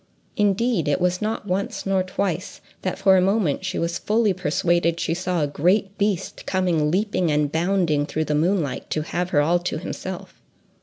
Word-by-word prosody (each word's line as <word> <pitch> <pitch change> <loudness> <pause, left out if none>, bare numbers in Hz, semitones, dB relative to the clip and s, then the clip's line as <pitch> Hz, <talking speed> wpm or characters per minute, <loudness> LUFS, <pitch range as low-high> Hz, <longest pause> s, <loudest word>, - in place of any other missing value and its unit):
Indeed, 205 -3 +1
it 145 - +1
was 180 0 0
not 215 0 -2
once 195 +1 -2
nor 195 -1 +2
twice 185 0 -3 0.2
that 185 - -2
for 195 -1 +5
a - - +4
moment 190 -4 +1
she 190 -1 -3
was 170 0 -1
fully 215 -1 +2
persuaded 170 -1 +1
she 165 - 0
saw 175 -2 -1
a - - +1
great 190 +7 +1
beast 200 -3 -2
coming 175 -5 +1
leaping 185 -2 0
and 150 -1 +1
bounding 165 -3 +1
through 155 0 -2
the 150 - -1
moonlight 160 -2 0
to 155 - -1
have 175 +3 -2
her 145 - +3
all 170 +4 +2
to 175 -2 -3
himself. 185 +2 -7
180 Hz, 185 wpm, -23 LUFS, 160-195 Hz, 0.2 s, for